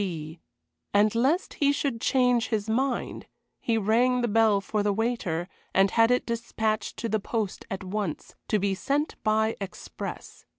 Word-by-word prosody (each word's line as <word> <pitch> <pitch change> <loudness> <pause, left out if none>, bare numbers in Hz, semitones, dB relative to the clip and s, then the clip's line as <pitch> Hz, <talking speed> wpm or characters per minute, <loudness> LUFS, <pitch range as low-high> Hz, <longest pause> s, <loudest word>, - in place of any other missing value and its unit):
B. 165 -4 -5 0.6
And 210 +1 +4
lest 270 +10 +1
he 285 -1 +5
should 275 -5 -2
change 250 -3 +3
his 220 -2 -1
mind, 250 +3 -1 0.3
he 230 -1 0
rang 240 +4 +3
the 240 - +1
bell 220 -2 +4
for 210 +2 -2
the 205 0 +2
waiter, 200 -6 -1 0.3
and 195 0 +4
had 225 0 +4
it 250 0 +2
despatched 220 -2 -2
to 230 - -2
the 220 0 0
post 210 -1 -3
at 195 -1 -4
once 190 -3 -4
to 215 - +2
be 200 -1 0
sent 280 +10 -1
by 220 0 +2
express. 195 - -7
220 Hz, 165 wpm, -27 LUFS, 200-240 Hz, 0.6 s, he